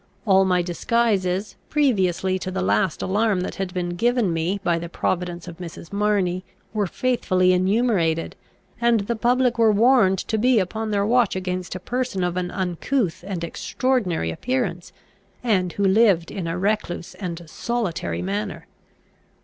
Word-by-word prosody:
All 195 -2 +5
my 180 -1 +2
disguises, 195 +1 0
previously 190 - +1
to 185 - -4
the 135 - -2
last 105 - +1
alarm 205 -1 +1
that - - -3
had 190 -2 -2
been 180 -1 -2
given 235 -2 +1
me 170 +5 -1
by 170 -3 +1
the 170 0 -6
providence 175 0 -2
of 170 -2 -8
Mrs. 170 0 -9
Marney, 200 -3 +1 0.3
were 210 -3 0
faithfully 185 -5 +2
enumerated; 185 -4 +1 0.5
and 235 -2 +3
the 230 +4 -2
public 245 +1 +2
were 225 -1 +6
warned 215 -3 +4
to 220 +4 -2
be 250 +2 +4
upon 220 +3 -1
their 200 -1 +1
watch 235 -2 +3
against 185 -1 -3
a - - -4
person 245 -2 -2
of 175 -1 -1
an 180 -1 -2
uncouth 185 +3 -1
and 185 -4 -4
extraordinary 180 - -1
appearance, 185 - -2 0.5
and 185 -7 +1
who 200 - -2
lived 195 -4 +4
in 180 -4 -4
a 165 +1 -2
recluse 195 -3 -2
and 175 -3 -6
solitary 170 - -2
manner. 100 +3 -3
190 Hz, 155 wpm, -23 LUFS, 175-225 Hz, 0.5 s, were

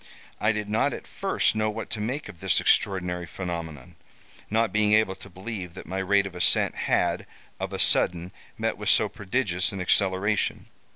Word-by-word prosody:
I 105 - +3
did 105 -1 -3
not 110 +2 +1
at - - -7
first - - 0
know 110 0 +1
what 110 +1 -6
to 110 - -3
make 130 +8 -3
of 100 -5 -11
this 95 -1 +2
extraordinary 90 -3 +1
phenomenon; 85 -6 -6 0.5
not 115 +1 +1
being 105 0 +3
able 110 -3 +4
to 100 - -13
believe 95 -2 -7
that - - -9
my 95 +2 -3
rate 100 +1 +3
of 95 - -6
ascent 90 - +3
had, 85 -1 0 0.3
of - - -3
a - - -3
sudden, 90 +1 +3 0.3
met - - -1
with - - -1
so - - +5
prodigious 95 -3 -1
an 100 - -6
acceleration. 95 +3 +1
95 Hz, 180 wpm, -26 LUFS, 90-105 Hz, 0.5 s, so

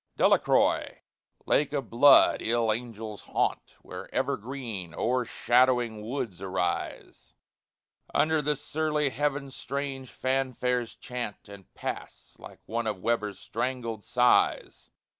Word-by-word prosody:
DELACROIX, - - +3 0.5
lake 145 0 +2
of 135 -6 -3
blood 135 +5 +6
ill 115 -1 +2
angels 110 -2 -6
haunt, - - -2
Where - - -9
ever - - 0
green, 110 - -7
o'ershadowing 120 -1 +2
woods 110 -5 -4
arise; 90 -2 -3 0.8
Under 155 +1 +2
the 150 +1 +1
surly 150 0 -1
heaven 145 0 -1
strange 135 -1 -5
fanfares 125 -2 -1
chaunt 120 -5 -6
And 100 -2 -13
pass, - - -7
like - - -12
one 115 0 -2
of 105 -2 -1
Weber's 105 -4 0
strangled 115 -1 -3
sighs. 125 0 +2
125 Hz, 110 wpm, -28 LUFS, 110-135 Hz, 0.8 s, blood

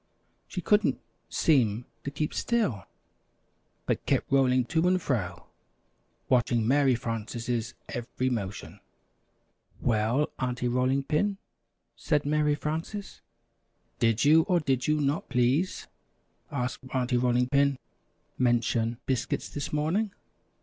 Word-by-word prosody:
She 180 - -5
couldn't 210 +4 +2 0.3
seem 120 -7 +2 0.2
to - - -3
keep 150 +2 -3
still, 170 - 0 1.0
but - - -1
kept - - +1
rolling 130 -2 +4
to 160 +5 +1
and 185 0 +3
fro, 90 - -2 0.8
watching 120 -2 +2
Mary 135 -1 +4
Frances' 115 0 -3
every 125 +2 -3
motion. 105 -4 -4 1.0
"Well, 115 +5 +1
Aunty 125 -1 -1
Rolling 130 +3 +1
Pin?" 195 +8 0 0.6
said 150 -3 0
Mary 150 0 +2
Frances. 165 +7 -5 0.8
"Did 115 +2 +2
you, 155 +2 +7
or 180 -3 +3
did 135 -5 0
you 150 0 +2
not, 145 +2 -1
please," 130 +9 +1 0.6
asked 125 -1 -3
Aunty 125 -1 +1
Rolling 125 0 +2
Pin, 140 0 +3 0.6
"mention 120 -1 +1
'Biscuits' 130 -2 -1
this 145 - -5
morning?" 160 +9 0
130 Hz, 115 wpm, -28 LUFS, 120-150 Hz, 1.0 s, you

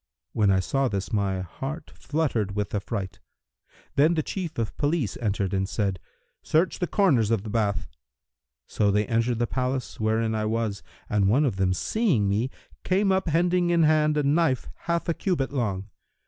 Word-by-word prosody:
When 105 -3 +3
I 95 -1 +4
saw 135 +8 0
this, 100 +1 -3
my 100 -3 0
heart 135 - -6
fluttered 120 -11 -1
with 105 -1 -2
affright. 100 -2 -3 0.8
Then 155 +5 +4
the 155 - 0
Chief 175 -2 -5
of 115 -3 -2
Police 145 - 0
entered 100 -4 -1
and 95 0 0
said, 100 -4 -1 0.4
'Search 165 +4 +1
the 180 - 0
corners 145 - +3
of 115 -4 +1
the 110 - -6
bath.' 100 -5 0 0.8
So 105 - +1
they 105 +1 +2
entered 115 +1 +1
the 120 - +1
place 130 +1 -3
wherein 110 +1 +1
I 110 -1 -1
was, 110 -2 -1 0.3
and 100 -2 +2
one 140 +8 +4
of 115 -8 -1
them 95 -1 +2
seeing 135 - +1
me, 105 +6 0 0.3
came 195 +1 +2
up 190 -1 +1
hending 175 +2 +2
in 170 -1 +4
hand 155 -1 +3
a 150 - +2
knife 145 -2 +1
half 170 0 -2
a 170 - +2
cubit 160 -8 -1
long. 100 -7 -2
115 Hz, 175 wpm, -26 LUFS, 100-155 Hz, 0.8 s, I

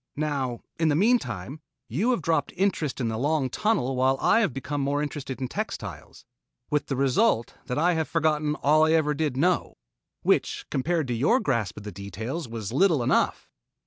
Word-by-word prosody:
Now 140 -6 -2 0.2
in 165 - +3
the 145 - +3
meantime, 150 - 0 0.3
you 170 - 0
have 240 -10 +1
dropped 160 -2 +1
interest 175 -8 0
in 120 - 0
the 110 0 -2
long 145 -1 0
tunnel 195 - 0
while 130 +1 +2
I 225 - +4
have 205 -9 +2
become 135 +3 -4
more 140 +1 0
interested 140 -3 -5
in 130 - -2
textiles - - -6 0.5
with 150 -1 0
the 135 - -1
result 135 - +2
that 125 - -2
I 175 +4 +3
have 160 -1 -1
forgotten 155 -2 +1
all 155 +2 +5
I 160 - +3
ever 155 -2 +2
did 150 -3 -1
know 175 +5 +1 0.5
which - - +1
compared 160 +2 0
to - - 0
your 145 - +3
grasp 115 - -1
of 105 - -8
the 105 - -6
details, 110 - -5
was 115 -2 -5
little 160 -3 +3
enough." - - +1
145 Hz, 185 wpm, -26 LUFS, 125-160 Hz, 0.5 s, all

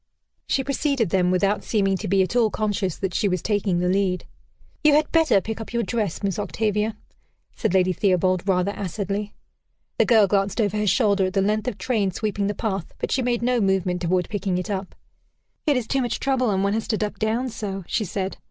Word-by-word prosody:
She 270 - +1
preceded 275 - 0
them, 180 -2 +3
without 195 +3 +1
seeming 195 -3 +1
to - - -5
be 195 +1 +3
at 185 - -4
all 235 -3 +4
conscious 205 -5 -1
that 190 -2 -3
she 205 - +1
was 185 -3 -1
taking 205 -4 0
the 180 +1 0
lead. 185 -1 0 0.6
"You 300 -1 +6
had 300 0 +2
better 320 -11 +4
pick 220 +2 -5
up 225 - -8
your 235 0 +1
dress, 210 -4 -2
Miss 195 0 -1
Octavia," 210 +1 -1 0.6
said 190 - -1
Lady 185 0 +3
Theobald 185 0 +1
rather 185 +1 +2
acidly. 200 +1 -4 0.6
The - - +5
girl 225 -4 +5
glanced 195 +2 0
over 210 -2 +1
her 210 0 0
shoulder 200 -1 +3
at 185 - -5
the 195 - +2
length 215 +2 0
of 235 -5 -2
train 205 -1 0
sweeping 205 +1 -2
the 205 - -2
path, 195 -6 -3
but - - -3
she 265 - +1
made 240 -1 0
no 245 -1 +2
movement 190 -2 +1
toward 180 0 +1
picking 195 -3 -2
it 180 +3 -3
up. 195 -1 -4 0.7
"It 290 -3 +4
is 245 - -1
too 270 +4 0
much 240 -2 -2
trouble, 265 -3 +1
and 195 -1 +1
one 200 0 +1
has 225 0 -2
to 215 - 0
duck 210 0 -3
down 230 +4 0
so," 200 -4 -5
she 220 - -1
said. 190 0 -3
205 Hz, 215 wpm, -23 LUFS, 190-225 Hz, 0.7 s, You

